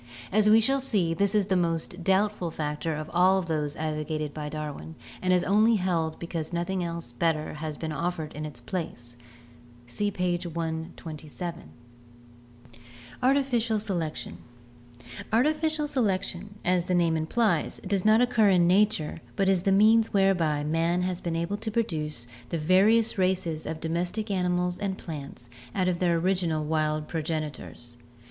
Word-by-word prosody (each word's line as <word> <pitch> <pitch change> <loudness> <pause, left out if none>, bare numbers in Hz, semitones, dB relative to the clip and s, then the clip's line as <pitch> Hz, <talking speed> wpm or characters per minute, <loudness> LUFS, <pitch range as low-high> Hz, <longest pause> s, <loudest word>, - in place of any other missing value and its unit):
As 210 +1 +4
we 220 +1 +7
shall 270 +5 +2
see, 205 -11 0
this 200 +4 +1
is 205 -2 +3
the 190 - +1
most 170 0 -1
doubtful 195 -1 +1
factor 155 0 -3
of 155 0 -5
all 185 +2 +5
of 190 - -1
those 150 -3 -2
advocated 155 -1 -3
by 150 -1 -5
Darwin 150 +1 -6 0.3
and 185 - +1
is 180 -1 +4
only 215 +4 +4
held 170 -5 0
because 170 -2 -5
noth 175 +1 -2
ing 170 -3 -2 0.2
better 160 -2 0
has 155 -1 -5
been 160 -1 -4
offered 165 -1 -3
in 150 - -6
its 145 -6 -7
place 120 -6 -5 0.7
(see 205 +13 -1
page 180 -2 -1
127). 160 0 -5 1.5
Artificial 250 -4 +2
Selection. 170 - -3 0.5
— 120 0 -13
Artificial 305 +5 +1
selection, 205 -6 -1
as 180 -1 +2
the 180 -1 +1
name 170 -2 +3
implies, 165 +2 0
does 195 -1 0
not 215 +2 +5
occur 235 -4 +4
in 180 -3 +4
nature 185 -4 +2 0.2
but 195 - +1
is 190 -2 +3
the 195 - +1
means 220 +3 +5
whereby 180 -7 +2
man 165 +3 +1
has 180 -1 -2
been 170 -1 -2
able 170 +5 -1
to 220 - -4
produce 155 - -2 0.2
the 170 - -1
various 195 +7 +3
races 185 -4 0
of 160 - -4
domestic 175 +7 -2
animals 180 -1 0
and 195 -2 -2
plants 140 -6 -8 0.2
out 185 -1 +1
of 175 -1 0
their 175 -2 +2
original 170 -3 0
wild 155 -1 0
progenitors. 155 -7 -5
175 Hz, 155 wpm, -27 LUFS, 155-195 Hz, 1.5 s, we